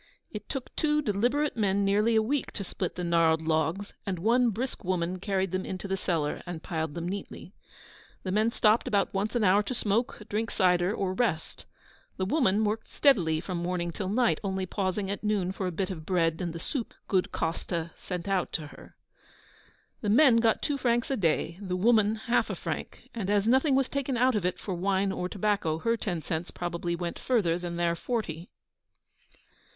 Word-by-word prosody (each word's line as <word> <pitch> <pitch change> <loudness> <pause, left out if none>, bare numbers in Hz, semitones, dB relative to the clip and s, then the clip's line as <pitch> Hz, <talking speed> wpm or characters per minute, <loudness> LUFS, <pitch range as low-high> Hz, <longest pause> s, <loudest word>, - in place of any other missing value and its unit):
It 210 - -8
took 270 -3 -5
two 300 -1 +1
deliberate 250 +7 +1
men 200 -2 +1
nearly 210 +3 +3
a 220 - +4
week 275 +5 -1
to 200 - -4
split 180 -1 -4
the 180 - -4
gnarled 165 -2 +3
logs, 160 +5 0
and 190 -2 -2
one 235 +7 +3
brisk 240 +4 -4
woman 180 0 -1
carried 190 -1 -1
them 185 0 -1
into 185 +1 -5
the 190 - 0
cellar 165 -6 -1
and 170 -2 -6
piled 160 -3 -3
them 170 0 -3
neatly. 195 -1 -6 0.7
The 185 - -2
men 215 +4 +2
stopped 220 0 +3
about 200 -1 +1
once 205 +4 -1
an 235 - +2
hour 200 +1 +5
to 250 +4 -4
smoke, 225 +2 0
drink 220 +2 -1
cider, 180 -1 +3
or 195 -3 -1
rest. 185 -7 -2 0.5
The 185 - 0
woman 215 -3 +2
worked 215 +1 -1
steadily 175 - +3
from 180 +1 -4
morning 175 0 -2
till 185 +2 -4
night, 235 +3 +2
only 190 -1 -1
pausing 195 +1 -2
at 200 - -5
noon 205 -4 +1
for 190 0 -3
a - - -2
bit 185 +3 -2
of 160 -4 -6
bread 165 -1 +1
and 175 -2 -2
the 165 - -6
soup 240 - -4
good 185 -2 +1
Coste 165 - -3 0.2
sent 180 0 -6
out 195 -2 0
to 155 - -2
her. - - -14 1.1
The 210 - -1
men 250 +2 +6
got 225 -1 +2
two 285 -1 -1
francs 240 0 +1
a - - +2
day, 170 -3 0
the 185 -2 -2
woman 215 +1 +4
half 235 +2 0
a - - -2
franc; - - -6
and 210 -5 -3
as 205 0 +2
nothing 265 +3 +4
was 270 -1 +2
taken 275 -2 -2
out 255 +2 +4
of 200 -5 +1
it 180 - -2
for 195 - -5
wine 190 +2 +1
or 180 -1 -3
tobacco, 200 -6 0
her 230 +7 +1
ten 180 -8 -3
cents 165 +2 -3
probably 175 0 -3
went 170 0 -4
further 185 -9 +1
than 175 -1 -4
their 170 0 +1
forty. 175 -5 -3
195 Hz, 200 wpm, -28 LUFS, 175-225 Hz, 1.1 s, men